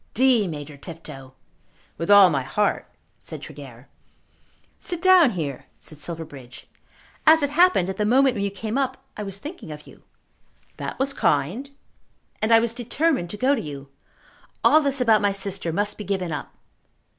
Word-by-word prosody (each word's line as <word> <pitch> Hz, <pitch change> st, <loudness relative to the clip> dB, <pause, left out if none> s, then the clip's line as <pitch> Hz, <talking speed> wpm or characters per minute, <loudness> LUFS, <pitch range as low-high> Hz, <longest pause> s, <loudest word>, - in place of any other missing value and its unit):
"D 245 Hz, -4 st, +4 dB
Major 150 Hz, -2 st, -7 dB
Tifto." 140 Hz, -5 st, -10 dB, 0.7 s
"With 165 Hz, -, -3 dB
all 200 Hz, -3 st, +8 dB
my 140 Hz, -3 st, 0 dB
heart," 205 Hz, +11 st, -1 dB, 0.3 s
said -, -, -7 dB
Tregear. -, -, -11 dB, 0.9 s
"Sit 350 Hz, -3 st, -4 dB
down 370 Hz, -5 st, +6 dB
here," 155 Hz, -, -5 dB
said 155 Hz, -, -11 dB
Silverbridge. 145 Hz, -6 st, -7 dB, 0.6 s
"As 315 Hz, -1 st, +7 dB
it 285 Hz, -, 0 dB
happened, 340 Hz, -, +4 dB
at 190 Hz, 0 st, -4 dB
the 210 Hz, -, 0 dB
moment 260 Hz, +4 st, +4 dB
when 200 Hz, -4 st, -3 dB
you 200 Hz, -, 0 dB
came 215 Hz, +6 st, -3 dB
up 260 Hz, -1 st, -1 dB, 0.2 s
I -, -, -6 dB
was 195 Hz, -2 st, -4 dB
thinking 290 Hz, -, -9 dB
of 150 Hz, 0 st, -9 dB
you." -, -, -16 dB, 0.8 s
"That -, -, -5 dB
was 275 Hz, +1 st, 0 dB
kind." 185 Hz, -, 0 dB, 0.7 s
"And 215 Hz, +2 st, 0 dB
I 230 Hz, -, +8 dB
was 230 Hz, 0 st, +1 dB
determined 250 Hz, -, -1 dB
to 210 Hz, -, -6 dB
go 260 Hz, +6 st, +2 dB
to 270 Hz, -, -1 dB
you. 140 Hz, -2 st, -8 dB, 0.7 s
All 310 Hz, -, +6 dB
this 280 Hz, -2 st, -1 dB
about 225 Hz, -3 st, +4 dB
my 205 Hz, -1 st, +2 dB
sister 195 Hz, -3 st, -3 dB
must 205 Hz, +5 st, -1 dB
be -, -, -4 dB
given 190 Hz, -4 st, -2 dB
up." 150 Hz, -, -5 dB
205 Hz, 170 wpm, -23 LUFS, 165-265 Hz, 0.9 s, all